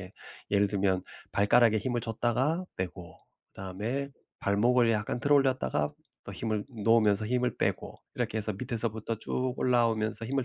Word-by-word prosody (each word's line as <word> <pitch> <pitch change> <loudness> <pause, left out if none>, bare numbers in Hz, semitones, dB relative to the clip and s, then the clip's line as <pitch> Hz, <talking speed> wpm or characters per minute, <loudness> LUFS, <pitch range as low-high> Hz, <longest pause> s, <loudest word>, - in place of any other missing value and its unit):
예. 95 +1 -10 0.4
예를 100 0 +3
들면 95 -2 +1 0.3
발가락에 110 +2 +4
힘을 120 +2 -1
줬다가 125 +10 0
빼고 90 -2 -6 0.3
그다음에 110 +9 -4 0.3
발목을 115 +4 +3
약간 110 +2 -1
들어 145 0 +3
올렸다가 130 - +1 0.3
또 - - -7
힘을 110 -2 -2
놓으면서 110 -2 +3
힘을 125 +2 0
빼고 - - -2
이렇게 110 - -2
해서 110 0 -1
밑에서부터 115 0 -2
쭉 130 0 -2
올라오면서 115 -3 +1
힘을 135 +1 -1
115 Hz, 345 characters per minute, -29 LUFS, 100-125 Hz, 0.4 s, 발가락에